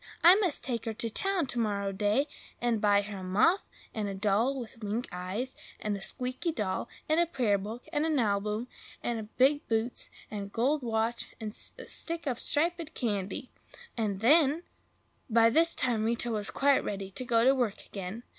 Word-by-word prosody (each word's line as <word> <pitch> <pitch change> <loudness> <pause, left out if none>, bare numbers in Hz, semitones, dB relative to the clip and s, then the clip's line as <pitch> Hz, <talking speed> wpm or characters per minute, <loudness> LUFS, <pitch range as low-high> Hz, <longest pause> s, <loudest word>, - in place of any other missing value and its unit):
I 345 +2 +10
must 370 -8 +1
take 235 -3 -3
her 225 -1 -3
to 230 +1 -3
town 390 - 0
to 245 -2 -3
morrow 200 -3 0
day, 210 +8 +1 0.3
and 235 -3 +1
buy 205 -1 +4
her 205 -1 -6
a - - -7
muff, 210 - +3 0.3
and 215 -2 -2
a 195 - -4
doll 215 +7 +1
with 230 -2 -8
wink 215 +4 -2
eyes, 185 +8 -4 0.2
and 210 -1 -1
a 200 - -6
squeaky 255 - -3
dog, 210 -6 -2 0.2
and 310 +2 +3
a 345 - +3
prayer 235 -10 +1
book, 220 +5 -7
and 295 0 +2
a 320 - +1
nalbum, 210 -5 +1 0.4
and 225 -2 -4
big 280 +3 +4
boots, 225 +2 -1 0.2
and 210 -1 -3
a - - -10
gold 265 +8 +1
watch 230 0 -1
and 215 -2 -4 0.3
a - - -8
stick 335 0 -2
of 255 -4 -1
striped 335 +1 0
candy! 210 +3 -2 0.4
and 205 -4 -1
then—" 300 +5 +5 0.7
But - - -7
by 230 0 +7
this 330 +5 +3
time 240 -4 +1
Rita 235 +1 0
was 210 -2 0
quite 280 0 +3
ready 195 -1 -4
to 255 - -3
go 230 -2 +3
to 265 - +7
work 245 -6 -1
again. 195 +4 -6
230 Hz, 195 wpm, -30 LUFS, 205-275 Hz, 0.7 s, I